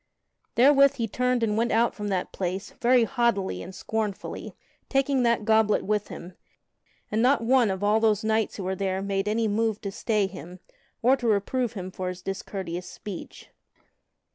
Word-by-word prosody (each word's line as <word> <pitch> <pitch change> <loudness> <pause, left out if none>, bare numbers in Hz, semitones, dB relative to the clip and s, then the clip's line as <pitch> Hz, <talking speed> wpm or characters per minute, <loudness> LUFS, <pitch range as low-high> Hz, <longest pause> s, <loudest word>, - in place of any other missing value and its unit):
Therewith 275 +3 +6
he 230 -4 -2
turned 250 +2 0
and 210 -2 +1
went 230 +2 +1
out 230 +2 +2
from 210 -1 -5
that 190 -3 -2
place 190 +1 -3
very 245 0 +5
haughtily 235 -6 0
and 185 +2 -9
scornfully, 220 -3 -4 0.3
taking 270 -1 +2
that 235 -3 +2
goblet 220 -1 +3
with 210 0 0
him, 175 +2 -9 0.8
and 215 +1 +1
not 255 +1 +4
one 245 -1 +4
of 190 +1 -3
all 210 +2 +3
those 215 -2 +2
knights 220 0 0
who 200 - -5
were 190 +1 -1
there 190 0 -2
made 195 0 -1
any 220 +1 +1
move 220 0 0
to 200 - -4
stay 210 0 0
him, 180 -1 -9 0.4
or 255 +3 +5
to 245 - -3
reprove 230 +4 0
him 185 -3 -6
for 185 0 -4
his 180 0 -8
discourteous 190 -2 -5
speech. 205 -5 -9
215 Hz, 175 wpm, -26 LUFS, 195-235 Hz, 0.8 s, Therewith